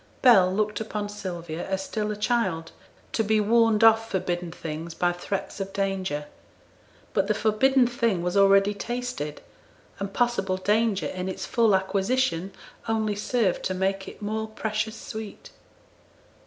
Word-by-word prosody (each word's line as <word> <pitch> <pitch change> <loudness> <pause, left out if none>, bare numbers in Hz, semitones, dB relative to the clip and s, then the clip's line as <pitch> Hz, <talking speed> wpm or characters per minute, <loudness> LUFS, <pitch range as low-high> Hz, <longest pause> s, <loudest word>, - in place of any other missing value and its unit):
Bell 195 -8 +7
looked 210 +2 0
upon 210 -1 -4
Sylvia 175 -5 -5
as 190 0 -1
still 210 +1 -3
a 210 - -2
child, 205 -7 0 0.4
to 225 - +1
be 215 0 +2
warned 225 0 +3
off 225 0 +6
forbidden 175 -3 -2
things 165 0 -6
by 175 0 +2
threats 195 +3 -4
of 195 0 -4
danger. 190 -6 -1 0.9
But 195 - +1
the 215 - +1
forbidden 245 +5 +3
thing 235 -7 0
was 180 +2 -1
already 195 +1 +5
tasted, 240 -8 -4 0.6
and 200 0 -3
possible 195 -6 0
danger 210 +1 +1
in 185 0 -3
its 190 - -4
full 225 -4 +3
acquisition 195 0 0 0.4
only 220 -2 0
served 210 -2 0
to 185 - -1
make 190 +1 -1
it - - -10
more 220 +1 -2
precious 220 0 -3
sweet. 220 -1 -8
205 Hz, 145 wpm, -26 LUFS, 185-220 Hz, 0.9 s, Bell